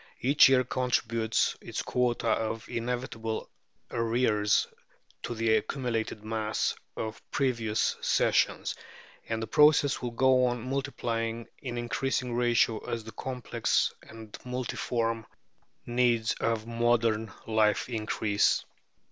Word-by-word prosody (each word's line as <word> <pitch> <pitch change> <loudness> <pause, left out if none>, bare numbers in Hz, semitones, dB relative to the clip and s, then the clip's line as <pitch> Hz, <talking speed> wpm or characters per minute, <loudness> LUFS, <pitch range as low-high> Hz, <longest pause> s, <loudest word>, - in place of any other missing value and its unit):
Each 140 +2 +6
year 130 -1 +5
contributes 115 -3 0
its - - -4
quota 120 -2 0
of 110 0 -1
inevitable 115 -2 -3 0.4
arrears 115 -3 +2 0.6
to 120 - -4
the 110 0 +2
accumulated 115 -5 -3
mass 110 0 -1 0.2
of 110 0 -4
previous 115 -6 0
Sessions, - - +2 0.6
and 110 0 -1
the - - -1
process 145 +4 +4
will 125 - -2
go 130 +2 +4
on 120 0 -1
multiplying 115 -4 -2
in 120 -3 -5
increasing 125 +1 -1
ratio 120 -2 +2
as 115 -1 -4
the 110 - -9
complex 125 +2 -1
and 110 -1 -11
multiform 120 -2 -2 0.6
needs 120 -2 +2
of 115 -1 0
modern 115 -2 +1
life 110 -1 +2
increase. 110 -3 +1
115 Hz, 110 wpm, -29 LUFS, 110-125 Hz, 0.6 s, Each